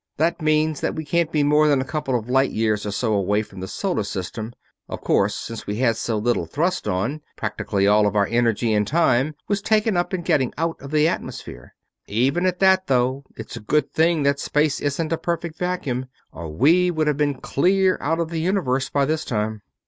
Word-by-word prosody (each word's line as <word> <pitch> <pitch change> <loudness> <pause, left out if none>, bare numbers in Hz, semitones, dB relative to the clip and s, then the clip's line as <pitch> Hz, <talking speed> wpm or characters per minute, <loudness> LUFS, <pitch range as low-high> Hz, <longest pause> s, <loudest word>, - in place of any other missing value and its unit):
That 165 +2 0
means 155 0 +1
that - - -1
we 160 - -5
can't 170 +1 0
be 150 -2 +2
more 150 +1 +4
than 145 -2 +3
a 130 - -2
couple 145 -3 -1
of 115 -1 -7
light 135 +2 +3
years 110 -1 -1
or - - -2
so 110 +2 0
away 100 +1 +1
from 95 -3 -12
the 95 - -5
Solar 190 - -2
System. 100 +3 -5 0.4
Of - - -6
course, - - +2
since 115 -1 -7
we 105 - -2
had 115 0 +2
so 110 0 -2
little 105 -6 0
thrust 175 - -1
on, 115 +12 -1
practically 100 -1 -1
all 105 +1 +4
of 100 - -2
our 100 -1 +4
energy 115 0 +1
and 105 -1 +1
time 145 -1 +2
was 205 -1 0
taken 215 0 +2
up 175 0 0
in 185 -2 -2
getting 130 -6 +1
out 165 +1 -2
of 140 - -8
the 155 +1 +3
atmosphere. 170 - -6 0.3
Even 135 - +1
at 180 -1 0
that, 190 0 +4
though, 130 +1 +1
it's - - -8
a - - -6
good 140 +7 0
thing 160 -1 +2
that 140 0 +2
space 150 0 0
isn't 155 +3 -1
a 165 - -2
perfect 170 -1 -3
vacuum, 140 -9 -2 0.2
or 80 -1 -7
we 165 - +3
would 160 -3 0
have 150 -2 +1
been 145 -2 +1
clear 185 +5 +2
out 160 +3 0
of 165 -1 -1
the 165 - -2
Universe 155 -8 0
by 140 -1 +1
this 155 +2 -1
time." 110 -1 -2
140 Hz, 215 wpm, -22 LUFS, 115-165 Hz, 0.4 s, more